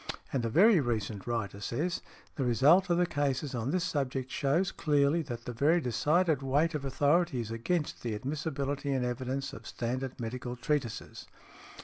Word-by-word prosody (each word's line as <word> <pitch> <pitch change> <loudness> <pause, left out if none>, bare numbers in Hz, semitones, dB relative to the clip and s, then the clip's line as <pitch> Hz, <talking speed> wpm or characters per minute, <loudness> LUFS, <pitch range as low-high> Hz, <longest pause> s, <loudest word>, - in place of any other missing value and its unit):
And 130 -3 0
a 115 - 0
very 190 - +6
recent 110 -6 -2
writer 105 -5 -2
says, 150 - -2 0.3
"The 140 - -1
result 145 - +4
of 170 - +3
the 180 - +3
cases 145 -3 -1
on 120 +1 -2
this 180 +3 +1
subject 135 -6 -2
shews 155 +7 +1
clearly 145 +2 +2
that 120 -6 -6
the 125 - -4
very 150 +8 +3
decided 155 +4 +2
weight 145 +5 +1
of 150 -2 -3
authority 145 +2 +2
is 115 -1 -4
against 150 +8 -2
the 115 -3 -2
admissibility 140 +2 -3
in 130 -2 0
evidence 130 +2 -3
of - - -10
standard 130 +2 -3
medical 120 +1 -4
treatises." 120 -2 -3
135 Hz, 165 wpm, -30 LUFS, 120-155 Hz, 0.3 s, very